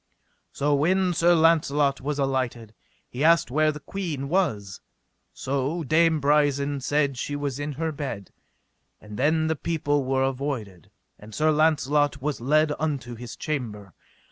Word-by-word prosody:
So 145 +1 0
when 180 +5 +2
Sir 175 +1 +4
Launcelot 150 -4 +2
was 145 +1 -3
alighted, 130 -5 -2 0.3
he 130 +4 -4
asked 165 -5 +4
where 155 +2 +2
the 150 - -8
queen 150 -4 -5
was. 110 - -1 0.5
So 140 +5 -2
Dame 160 +2 +3
Brisen 145 -1 +1
said 140 -1 0
she 145 - -3
was 145 -2 -3
in 145 0 -3
her 160 +3 -2
bed; 140 -9 -6 0.7
and 105 0 -11
then 155 +6 +1
the 160 0 0
people 145 -2 -1
were 130 0 0
avoided, 130 - -4 0.3
and 105 +1 -12
Sir 155 +1 +2
Launcelot 150 -2 +2
was 145 -2 -3
led 150 +4 +2
unto 140 -6 -3
his 120 0 -8
chamber. 110 - -5
145 Hz, 145 wpm, -25 LUFS, 130-155 Hz, 0.7 s, Sir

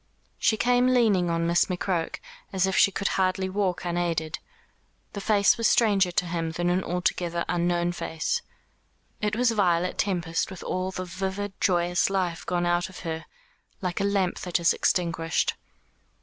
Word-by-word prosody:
She 220 - +2
came 245 +2 +3
leaning 205 -8 +3
on 165 0 0
Miss 170 +1 +3
McCroke, 180 -2 -2 0.4
as 190 -2 +2
if 190 - -1
she - - +6
could 200 +1 -1
hardly 190 0 0
walk 190 -2 -1
unaided. 170 -2 -1 0.7
The 200 - -5
face 205 +1 +3
was 230 - +3
stranger 200 -5 +3
to 180 +1 0
him 165 -1 -3
than 175 +2 0
an 185 +1 +1
altogether 175 -1 -1
unknown 175 0 +1
face. 160 -2 -2 0.8
It 210 0 0
was 245 0 +3
Violet 180 -4 +1
Tempest 175 -4 0
with 190 -2 -9
all 185 0 -2
the 185 -1 -5
vivid 190 +2 -4
joyous 175 0 +2
life 185 -4 -1
gone 175 -1 0
out 175 +1 +1
of 185 - -11
her, 160 -1 -4 0.5
like 180 -1 -3
a - - +1
lamp 200 -3 0
that 180 -1 -1
is 170 0 +4
extinguished. 165 -2 0
180 Hz, 165 wpm, -26 LUFS, 175-195 Hz, 0.8 s, she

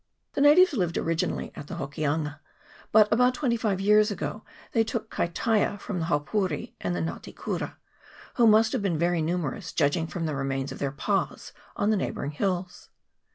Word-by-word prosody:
The - - -1
natives 320 +5 +7
lived 180 - 0
originally 165 0 -1
at 145 - -8
the - - -6
Hokianga, 145 +1 -2 0.5
but 215 -1 +7
about 250 +2 +4
twenty 250 -5 +1
five 210 -5 0
years 210 +2 +4
ago 210 +1 -4 0.3
they 225 - +3
took 225 -1 -4
Kaitaia 205 +4 0
from 195 -2 -4
the 160 - -1
Haupouri 175 +5 -1
and 90 -1 -1
Nga 85 -1 -3
te - - -10
kuri, - - -4 0.6
who 235 - +4
must 220 +1 +5
have 255 - 0
been 185 -5 0
very 170 +1 +1
numerous, 160 -3 -2
judging 160 +4 +1
from 165 0 -4
the 155 - -2
remains 135 0 -2
of - - -8
their 140 - 0
pas 185 +7 -2 0.2
on 205 +1 +1
the 215 - +2
neighbouring 145 -5 -3
hills. 180 +2 -3
180 Hz, 180 wpm, -27 LUFS, 155-215 Hz, 0.6 s, natives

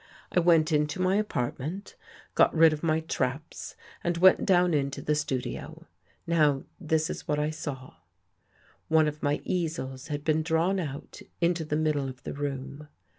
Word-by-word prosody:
I - - +3
went 165 -2 +4
into 150 +1 +1
my 185 +2 +2
apartment, 170 - -3 0.4
got - - +5
rid 160 -1 +6
of 150 - -5
my 160 -1 +1
traps 145 -1 -3 0.3
and 175 0 0
went 185 +4 +5
down 180 -2 +4
into 140 -2 0
the 150 - 0
studio. 140 -4 -4 0.4
Now 150 -5 +2 0.2
this 160 -3 +1
is - - -7
what 150 - +1
I 150 +1 0
saw: 135 - -7 0.9
One 160 -1 +4
of 150 0 -4
my 145 0 0
easels 155 -6 -3
had 145 -1 -4
been 155 +1 +2
drawn 165 +4 +1
out 145 -5 -6 0.2
into 170 -1 +1
the 150 -1 -2
middle 150 -3 0
of 130 0 -11
the - - -5
room. 140 +1 -5
155 Hz, 165 wpm, -28 LUFS, 145-165 Hz, 0.9 s, rid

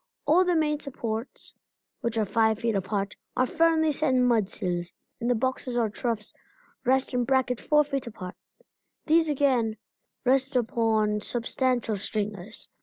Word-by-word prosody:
All 330 +6 +5
the 360 -1 +1
main 300 -2 +1
supports, 235 -4 -4 0.5
which 235 -1 -2
are 220 - +2
five 220 +1 +2
feet 230 0 0
apart, 195 0 -2 0.2
are 255 - +4
firmly 320 +2 +3
set 285 -2 +1
in 250 -1 +4
mudsills, 185 -6 0 0.3
and 240 0 -1
the 245 - +3
boxes 255 +1 -1
or 225 -3 +1
troughs 225 -2 -2 0.5
rest 265 +1 +2
in 245 0 +2
brackets 260 -1 +1
four 300 0 +4
feet 275 -3 -3
apart. 185 -5 -7 0.7
These 320 0 +4
again 255 -6 +2 0.5
rest 265 +1 +2
upon 220 -3 +1
substantial 240 -1 0
stringers. 205 0 -3
240 Hz, 145 wpm, -27 LUFS, 215-270 Hz, 0.7 s, All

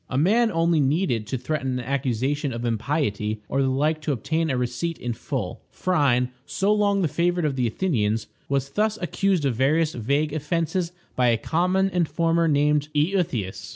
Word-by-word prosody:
A 130 - -2
man 220 - +3
only 165 -1 +2
needed 135 - +1
to 130 - -2
threaten 130 -1 -2
an 125 - -5
accusation 135 +1 -1
of 120 0 -4
impiety 110 -3 -1
or 135 - 0
the 135 - +2
like 150 +4 +1
to 150 - -1
obtain 160 +5 -1
a 130 - 0
receipt 125 +7 -2
in 120 -1 -3
full. 110 -5 -4
Phryne, 140 -9 +1
so 195 +8 +1
long 200 -2 +2
the - - +3
favorite 175 +2 0
of 145 -3 0
the 125 -2 +1
Athenians, 115 - 0 0.2
was 140 0 -1
thus 215 +3 0
accused 185 -2 0
of 135 - +2
various 155 +6 +2
vague 140 +6 0
offenses 165 +3 -1 0.2
by 125 -1 +3
a 115 -1 +3
common 180 - +1
informer 170 -1 +1
named 150 0 +2
Euthias. 150 - -1
145 Hz, 175 wpm, -24 LUFS, 125-170 Hz, 0.2 s, man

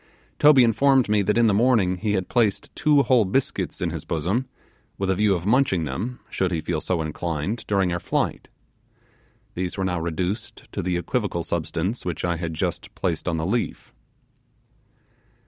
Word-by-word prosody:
Toby 145 -3 +7
informed 130 +2 +3
me 105 -1 +3
that 105 +3 +1
in 120 - +5
the 110 - +4
morning 105 -5 +3
he 105 +2 -1
had 95 -2 -1
placed 110 -5 0
two 150 -2 +4
whole 125 -4 +4
biscuits 105 -1 -1
in 85 -2 0
his 80 -2 -5
bosom, 90 - -1 0.5
with 95 -1 0
a - - +1
view 105 0 +3
of 85 0 -4
munching 110 -6 +2
them, 105 - -4
should 95 -1 -1
he 85 - 0
feel 80 -1 -2
so 85 -3 -1
inclined, 80 +6 -3
during 95 -3 +1
our 85 - -1
flight. 85 - -2 1.0
These 90 +1 -3
were 95 - 0
now 90 -2 -1
reduced 90 +5 -3
to - - -3
the 90 0 -1
equivocal 90 -2 -2
substance 85 +7 -2
which 90 -1 -3
I 85 -1 0
had 80 -1 -4
just - - -3
placed 90 -1 -2
on 85 - -1
the 80 - -2
leaf. 115 +6 -2
95 Hz, 180 wpm, -24 LUFS, 85-115 Hz, 1.0 s, Toby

